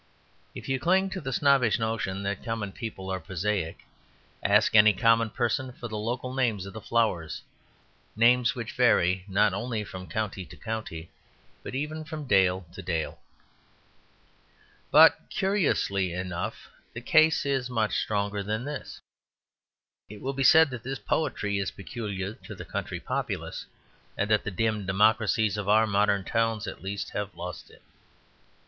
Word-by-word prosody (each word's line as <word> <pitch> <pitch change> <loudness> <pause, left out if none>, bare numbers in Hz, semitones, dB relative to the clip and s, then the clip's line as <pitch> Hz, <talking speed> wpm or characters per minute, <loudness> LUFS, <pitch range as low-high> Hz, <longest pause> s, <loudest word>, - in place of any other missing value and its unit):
If - - -8
you 135 0 0
cling 190 +5 +2
to 190 - -4
the 135 - -4
snobbish 135 -4 +3
notion 110 -4 -2
that 100 -1 -3
common 115 -3 -3
people 95 -4 -6
are 95 - -2
prosaic, 90 0 -3 0.6
ask 105 +1 +3
any 105 0 +8
common 115 +3 +3
person 125 +3 -1
for 120 - -7
the 110 - -6
local 125 +4 -3
names 115 -7 0
of 100 - -9
the 110 - -7
flowers, 95 -9 0 0.7
names 120 +3 +4
which 120 -2 -5
vary 95 -7 +3
not 100 0 +3
only 110 +2 -2
from 95 -2 -9
county 105 -3 -3
to - - -13
county, 110 -8 -6 0.5
but - - -7
even 150 +3 -3
from 155 -1 -7
dale 95 -4 +3
to 100 - -8
dale. 85 -4 -3 1.7
But, - - +6
curiously 140 - 0
enough, 90 0 -5 0.2
the 115 - -6
case 155 +4 +4
is 135 -3 0
much 110 -4 0
stronger 100 -1 -1
than 110 +5 -3
this. 145 0 -6 1.1
It 105 0 -10
will 135 +4 -3
be 135 - -3
said 160 +1 +7
that 120 -3 -6
this 135 +3 -4
poetry 100 -10 -1
is 95 - -1
peculiar 100 -1 -5
to 120 - -11
the - - -8
country - - -4
populace, - - -4 0.5
and 105 +2 -1
that 105 - +3
the - - -1
dim 105 0 -1
democracies 110 +1 +2
of 105 -1 -3
our 110 +2 +5
modern 100 -1 +2
towns 115 0 0
at - - -7
least 100 +1 -4
have 105 -1 -4
lost 90 0 -7
it. - - -19
110 Hz, 155 wpm, -27 LUFS, 100-125 Hz, 1.7 s, any